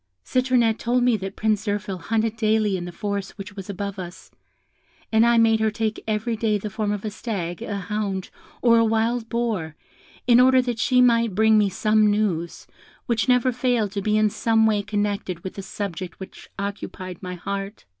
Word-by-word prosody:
"Citronette 250 -3 +2
told 245 +1 +1
me 245 -2 +4
that 195 0 -6
Prince 215 -1 0
Zirphil 205 -2 -2
hunted 225 +4 -1
daily 215 -2 +1
in 175 -2 -4
the 175 - -6
forest 200 +2 -4
which 200 0 -8
was 195 -1 -8
above 200 0 -4
us; 175 0 -9 0.8
and 220 0 +5
I 235 0 +4
made 225 -1 +4
her 220 0 +2
take 215 0 -3
every 220 +2 -1
day 215 -1 +1
the 210 +1 -6
form 210 0 -1
of 205 0 -3
a 215 - -2
stag, 195 -5 -4
a 210 -3 -3
hound, 195 -1 -3 0.3
or 230 -1 +6
a - - +4
wild 225 +1 0
boar, 220 -10 -2 0.5
in 240 -1 +6
order 260 +1 +6
that 245 -2 -1
she 250 +1 +3
might 230 -4 +3
bring 220 +1 +4
me 210 -2 +4
some 215 +2 +3
news, 195 -6 -1 0.4
which 235 +1 0
never 250 0 +4
failed 245 -4 0
to 200 -1 -3
be 215 +2 +1
in 215 -1 +3
some 225 +1 +2
way 215 -2 +2
connected 205 -4 -2
with 190 - -5
the 195 - -6
subject 185 -2 -6
which 190 - -11
occupied 195 -2 -6
my 180 -1 -5
heart. 200 +3 -5
215 Hz, 195 wpm, -23 LUFS, 195-230 Hz, 0.8 s, or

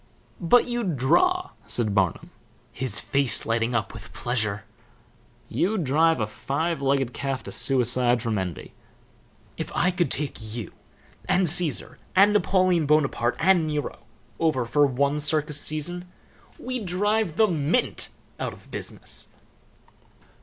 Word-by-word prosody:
"But 210 +8 +5
you'd 235 - -2
draw," 365 - +2 0.2
said 110 -4 +1
Barnum, 95 -4 0 0.4
his 120 -5 +1
face 140 -3 +1
lighting 115 +1 0
up 110 -4 -1
with 115 -2 -11
pleasure. 110 -4 -1 0.8
"You'd 195 0 0
drive 160 +3 +3
a 110 - +1
five 145 +9 -3
legged 135 -2 +1
calf 135 -4 -3
to - - -8
suicide 125 -2 +3
from 110 -3 -1
envy. 90 -4 -6 0.8
If - - -5
I 180 - +2
could 180 -1 0
take 145 -2 -2 0.2
you 115 -6 -6 0.6
and 185 -1 +3
Caesar, 165 -1 +1 0.2
and 200 +2 +6
Napoleon 185 -5 +2
Bonaparte 140 -5 +2
and 175 -2 +3
Nero 150 -1 -3 0.4
over 155 -7 +1
for 145 +5 +3
one 140 +3 0
circus 150 0 +1
season 175 +4 -2 0.5
we'd 250 -5 -5
drive 205 -1 0
the 220 - +5
mint 165 - 0 0.3
out - - -3
of - - -17
business." - - -6
150 Hz, 130 wpm, -25 LUFS, 125-180 Hz, 0.8 s, and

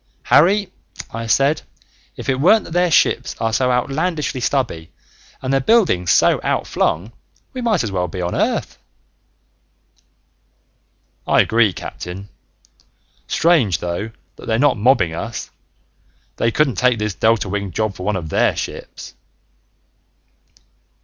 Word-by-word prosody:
"Harry," 190 +4 +3 0.4
I 115 0 -5
said, 140 +6 +2 0.6
"if - - -8
it 130 -1 0
weren't 200 +9 +5
that - - -11
their 175 +1 +2
ships 160 - +2
are 115 0 -1
so 125 +2 +2
outlandishly 145 +2 -1
stubby 120 - -2 0.5
and 130 +1 -1
their 135 - +3
buildings 135 - +2
so - - +4
outflung, 90 +8 -1 0.4
we 255 - -5
might 215 - +1
well 90 -2 -1
be 90 - -7
on 90 0 -2
Earth!" - - -1 2.5
"I - - +5
agree, 110 -2 +3
Captain. 90 +2 -8 1.0
Strange, 145 - +2
though, 90 +6 -4 0.3
that - - -12
they're 110 - +1
not 140 +2 +3
mobbing 105 -7 +2
us. 115 +8 -6 0.9
They 115 - +1
couldn't 130 -4 +1
take 125 -2 +3
this 105 -1 -2
delta 110 +1 +1
winged 100 -1 -4
job 110 -2 -1
for 95 - -12
one 105 +2 -1
of 85 -4 -5
their - - +2
ships!" - - -7
115 Hz, 130 wpm, -19 LUFS, 95-145 Hz, 2.5 s, weren't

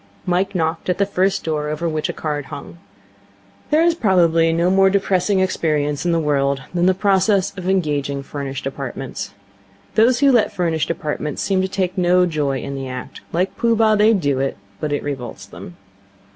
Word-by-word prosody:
Mike 185 +2 0
knocked 160 0 -1
at 180 - +1
the 200 - +2
first 195 0 0
door 150 -2 -2
over 155 +3 -2
which 155 -1 -2
a - - -2
card 150 -2 -3
hung. 140 +5 -9 0.9
There 310 +2 +4
is 340 0 +4
probably 170 - +3
no 170 +2 +2
more 195 0 +5
depressing 190 0 +1
experience 150 -4 0
in - - +2
the 165 - +2
world 140 -3 0
than 175 0 +2
the 185 - +3
process 195 0 +2
of 185 -1 -4
engaging 145 -6 0
furnished 135 -1 -6
apartments. 135 -1 -5 0.6
Those 235 +3 +4
who 280 -1 +6
let 235 -4 +3
furnished 165 -4 -1
apartments 155 -3 -3
seem 190 -2 +1
to 190 - 0
take 190 0 -2
no 180 0 +4
joy 145 -5 -1
in 140 - -5
the 135 -1 -5
act. 125 -1 -7
Like 180 +3 -1
Pooh 230 -1 +2
Bah, 220 -1 +4
they 210 +1 +5
do 145 -8 0
it, 135 0 -1 0.2
but 150 - -3
it 145 - -1
revolts 135 -5 -5
them. 90 - -11
170 Hz, 185 wpm, -20 LUFS, 145-190 Hz, 0.9 s, who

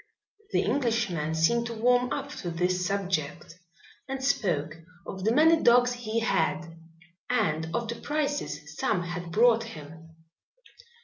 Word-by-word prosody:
The - - +2
Englishman 215 - 0
seemed 235 +9 +2
to 230 - -5
warm 245 +2 +2
up - - -3
to 175 - -4
this 180 +2 0
subject 180 -4 -3 0.5
and 270 0 -4
spoke 165 - 0 0.3
of 190 -1 -7
the 220 - +3
many 320 +5 +5
dogs 245 +1 +5
he 230 -2 -3
had, 175 -6 0 0.5
and 165 -10 0
of 235 -1 -1
the 235 - -2
prices 280 - -3
some 180 - +1
had 175 0 -6
brought 230 +4 +4
him. 160 -5 -11
200 Hz, 135 wpm, -27 LUFS, 165-240 Hz, 0.5 s, many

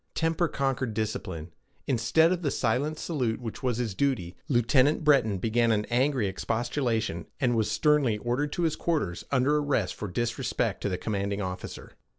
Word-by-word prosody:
Temper 165 +1 +1
conquered 135 -5 -1
discipline. 95 -7 -3 0.3
Instead 135 +7 +3
of 180 -1 0
the 150 - 0
silent 135 +6 0
salute 125 -11 -1
which 115 -3 -6
was 125 -3 0
his 120 -4 -2
duty, 105 -8 -1
Lieutenant 130 +4 +3
Breton 135 -9 +4
began 115 +4 +2
an 105 -1 +1
angry 130 -1 +2
expostulation, 115 - -1
and 125 -3 +2
was 110 -2 +1
sternly 130 0 +3
ordered 125 +7 -1
to 175 - -1
his 160 -2 +1
quarters, 145 - -1
under 140 +2 +3
arrest 145 -10 0
for 105 - -5
disrespect 115 +5 -1
to - - -1
the 90 - -1
commanding 100 0 -2
officer. 90 0 -6
120 Hz, 165 wpm, -28 LUFS, 110-145 Hz, 0.3 s, Breton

